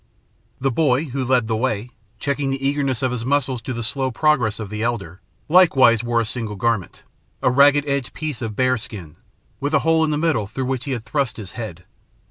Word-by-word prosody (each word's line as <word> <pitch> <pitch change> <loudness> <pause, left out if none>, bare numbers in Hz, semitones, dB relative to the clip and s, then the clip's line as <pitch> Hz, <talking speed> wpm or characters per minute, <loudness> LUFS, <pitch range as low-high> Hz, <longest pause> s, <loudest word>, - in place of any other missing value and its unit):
The 135 +1 +1
boy, 140 +1 +2
who 135 -2 -3
led 125 -3 +2
the 110 - 0
way, 115 0 -1 0.3
checking 140 +2 -1
the 135 0 -1
eagerness 140 -3 0
of 130 - +1
his 120 -2 -3
muscles 130 -2 0
to 130 - -5
the 120 -1 -3
slow 130 +3 -1
progress 125 -5 +1
of 105 -2 -6
the 105 0 -4
elder, 100 -7 -3 0.3
likewise 135 - +5
wore 120 0 +1
a 115 - 0
single 110 -2 -4
garment 110 -2 -1 0.4
a 130 - +4
ragged 145 +2 +5
edged 140 -3 -1
piece 150 -6 -4
of 110 -3 -4
bear 130 0 +2
skin, 100 -10 -10 0.4
with 145 +3 0
a - - +5
hole 165 0 +4
in 160 - +1
the 150 - 0
middle 150 -10 +1
through 130 +5 -4
which 130 -1 -2
he 140 - -2
had 120 -2 -5
thrust 135 -2 -1
his 100 -4 -8
head. 100 -8 -7
125 Hz, 215 wpm, -21 LUFS, 115-140 Hz, 0.4 s, likewise